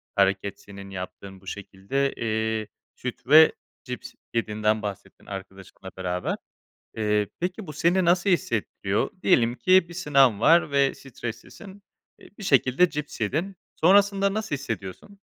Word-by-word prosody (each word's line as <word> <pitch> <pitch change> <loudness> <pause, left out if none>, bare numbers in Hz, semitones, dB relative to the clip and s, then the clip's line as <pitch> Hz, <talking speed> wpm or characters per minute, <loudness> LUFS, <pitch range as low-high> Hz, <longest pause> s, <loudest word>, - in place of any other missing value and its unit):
hareket, 100 0 +1
senin 100 -1 -11
yaptığın 95 +1 -8
bu 95 - -19
şekilde. 100 +9 -3
Eee, 110 -1 -2 0.3
süt 125 0 -7
ve 155 +2 +8 0.3
cips 125 0 -7 0.2
yediğinden 110 -1 0
bahsettin 100 -1 -8
arkadaşınla 95 -1 -9
beraber. 90 -1 -2 0.6
Eee, 105 -1 +1
peki, 180 +2 -3
bu 150 - -7
seni 175 +5 +2
nasıl 175 +3 +3
hissettiriyor? 105 - -1
Diyelim 120 -9 +3
ki, 185 +3 +4
bir 170 - -10
sınav 135 - +3
var 165 +2 +5
ve 140 -1 +2
streslisin. 140 - -9 0.4
Eee, - - -16
bir - - -9
şekilde 140 +2 +3
cips 150 -5 -6
yedin. 165 - -2 0.2
Sonrasında 200 +2 +4
nasıl 220 -8 -2
hissediyorsun? 115 - -7
125 Hz, 135 wpm, -25 LUFS, -, 0.6 s, ve